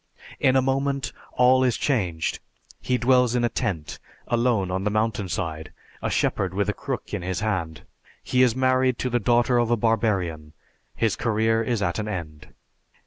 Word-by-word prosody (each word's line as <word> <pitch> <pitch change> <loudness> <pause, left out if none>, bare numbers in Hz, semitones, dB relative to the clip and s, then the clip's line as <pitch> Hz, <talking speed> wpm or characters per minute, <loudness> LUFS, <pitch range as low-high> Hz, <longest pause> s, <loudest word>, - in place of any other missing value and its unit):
In 130 - +3
a 130 - +4
moment 135 +1 -1 0.2
all 130 +1 +4
is 125 -4 +1
changed. 90 - -1 0.4
He 125 - 0
dwells 125 -1 +3
in 120 - +1
a 120 - +2
tent, 85 -9 -3 0.3
alone 120 -6 +1
on 95 +1 -2
the 105 - +1
mountain 110 -2 -1
side, 80 -3 -4 0.3
a - - -1
shepherd 95 -2 0
with 100 +1 0
a - - +1
crook 135 -2 -5
in 105 - -2
his 90 +2 -3
hand. 90 -8 -2 0.4
He 125 - +1
is 125 -3 +4
married 130 -1 +2
to 130 - -2
the 120 - +2
daughter 120 +2 +3
of 120 -1 +1
a 120 - +2
barbarian; 95 -9 0 0.4
his 115 -3 +1
career 115 0 +1
is 115 -2 -1
at 85 +2 -1
an 105 - -3
end. 80 -7 -6
115 Hz, 180 wpm, -24 LUFS, 95-125 Hz, 0.4 s, a